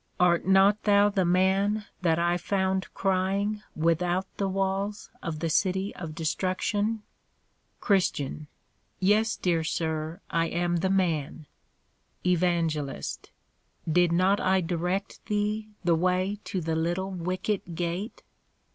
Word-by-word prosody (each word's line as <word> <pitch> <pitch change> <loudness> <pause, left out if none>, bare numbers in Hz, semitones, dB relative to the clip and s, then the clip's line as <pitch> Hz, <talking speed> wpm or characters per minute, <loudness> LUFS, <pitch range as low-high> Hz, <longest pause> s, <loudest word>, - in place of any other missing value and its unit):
Art 175 0 +3
not 195 +2 +5
thou 205 0 +5
the 195 -3 +1
man 190 +4 +2 0.2
that 165 -3 +2
I 175 +1 +2
found 190 +1 -1
crying 195 +2 0
without 175 +3 +1
the 200 - 0
walls 195 +2 -2
of 160 -3 -4
the 165 - 0
City 190 +3 +1
of 160 -3 -7
Destruction? 205 +6 -1 0.8
CHR. 155 - 0 0.5
Yes, 210 +4 +3
dear 170 -3 0
Sir, 160 +1 -2
I 165 0 +2
am 175 +1 0
the 190 +3 0
man. 165 -5 0 0.8
EVAN. 175 -2 +2 1.2
Did 175 +1 +4
not 185 +4 +3
I 190 0 +3
direct 180 +3 -2
thee 210 +1 -1
the 170 -1 +3
way 185 +4 +1
to 190 -4 -3
the 160 0 -1
little 175 +4 -1
Wicket 185 0 -3
gate? 175 +6 -3
185 Hz, 120 wpm, -27 LUFS, 170-195 Hz, 1.2 s, not